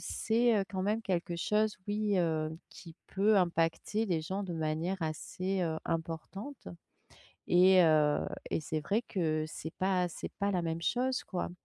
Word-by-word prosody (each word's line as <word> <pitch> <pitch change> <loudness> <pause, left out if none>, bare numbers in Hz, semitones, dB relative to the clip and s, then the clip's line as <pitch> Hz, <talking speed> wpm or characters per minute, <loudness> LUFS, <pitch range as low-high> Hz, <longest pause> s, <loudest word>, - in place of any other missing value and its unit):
c'est, 230 0 +2
heu, - - -1
quand 190 -1 -3
même 215 +3 0
quelque 175 -2 -1
chose, 210 +4 +1
oui, 205 -1 0
heu, 160 -2 +1 0.2
qui 165 -1 -12
peut 205 +2 +3
impacter 175 +5 +1
les 170 -4 0
gens 190 +5 -3
de 175 -3 -4
manière 160 +4 -1
assez, 185 +5 -2
heu, 160 -2 0
importante. 165 - -5 0.8
Et 185 +1 +6
heu 155 -2 +3 0.2
et - - -1
c'est 155 +1 -2
vrai 205 +11 0
que 155 -5 0
c'est 160 +1 -7
pas 185 -1 +1
c'est - - -7
pas 200 0 +1
la 180 -2 0
même 165 0 -2
chose, 255 +6 0
quoi, 180 -3 -3
180 Hz, 165 wpm, -32 LUFS, 160-205 Hz, 0.8 s, Et